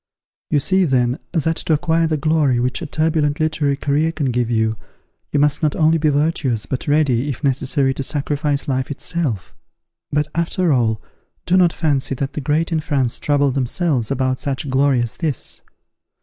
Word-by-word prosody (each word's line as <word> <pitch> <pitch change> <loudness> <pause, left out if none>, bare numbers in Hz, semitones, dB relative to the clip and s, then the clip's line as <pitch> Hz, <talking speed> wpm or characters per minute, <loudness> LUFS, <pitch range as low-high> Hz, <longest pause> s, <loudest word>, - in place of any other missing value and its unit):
You 150 - +3
see, 190 +6 +2
then, 125 -1 +1
that 165 -1 0
to 160 - 0
acquire 165 +1 +2
the 155 -1 0
glory 150 -4 +2
which 125 +1 -1
a - - -4
turbulent 155 -1 0
literary 155 -3 0
career 150 +3 +1
can 145 -5 -1
give 120 -1 0
you, 110 -1 +1 0.6
you 145 - +1
must 145 0 +2
not 155 -2 +1
only 160 +1 +3
be 155 0 +2
virtuous, 145 -6 0
but 130 +4 -4
ready, 145 -3 +2
if 140 +1 -5
necessary, 135 0 +1
to 135 - -5
sacrifice 145 +1 -1
life 130 -2 -1
itself. 145 - -3 0.6
But, 150 0 +1
after 170 0 +1
all, 110 -4 +1 0.5
do 180 - +2
not 180 -2 +5
fancy 140 -5 0
that 135 +1 -3
the 150 - -4
great 155 +5 0
in 160 - +1
France 135 -6 -1
trouble 145 -1 +2
themselves 130 -1 -1
about 130 0 0
such 140 +1 -3
glory 135 -2 +3
as 120 - -6
this. 155 -6 -4
145 Hz, 175 wpm, -19 LUFS, 130-155 Hz, 0.6 s, not